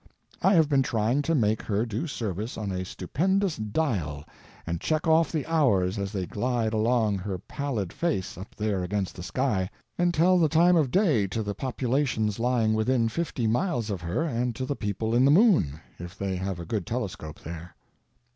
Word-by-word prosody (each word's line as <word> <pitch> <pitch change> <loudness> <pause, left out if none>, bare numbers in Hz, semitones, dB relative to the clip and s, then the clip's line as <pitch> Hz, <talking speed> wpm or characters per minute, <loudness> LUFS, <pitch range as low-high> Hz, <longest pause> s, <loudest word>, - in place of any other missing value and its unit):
I 190 +1 +4
have 160 -3 +5
been 140 -2 +3
trying 120 0 +1
to 165 +3 0
make 110 -5 +2
her 105 +2 -1
do 115 +8 -3
service 110 - -4
on 105 -3 -3
a 95 0 -3
stupendous 185 - 0
dial 105 - -2 0.4
and 85 0 -3
check 155 +1 0
off 160 +1 +4
the 155 -4 -2
hours 105 - +2
as 100 -1 -3
they 95 -3 -2
glide 115 +2 -1
along 110 -2 +2
her 95 0 -4
pallid 115 - -4
face 165 - -1
up 95 +4 -10
there 105 -3 -1
against 95 +1 -2
the - - -8
sky, 95 0 -1 0.3
and 175 0 +3
tell 180 +3 +4
the 160 -3 +3
time 170 +3 +5
of 155 -6 +3
day 150 - +3
to 110 +4 -3
the 100 0 -3
populations 125 -3 -1
lying 115 -2 +2
within 115 +1 +2
fifty 140 -4 -2
miles 120 - 0
of 95 -4 -3
her 85 - -1
and 125 -6 -1
to 130 - -3
the 140 - -2
people 110 +1 -2
in 120 +2 +4
the 135 - +5
moon, 155 - +4 0.2
if 90 +2 -8
they 95 -1 -2
have 95 -1 -3
a 85 - -6
good 100 -1 -3
telescope 100 -10 -4
there. 85 +2 -8
115 Hz, 195 wpm, -27 LUFS, 95-145 Hz, 0.4 s, have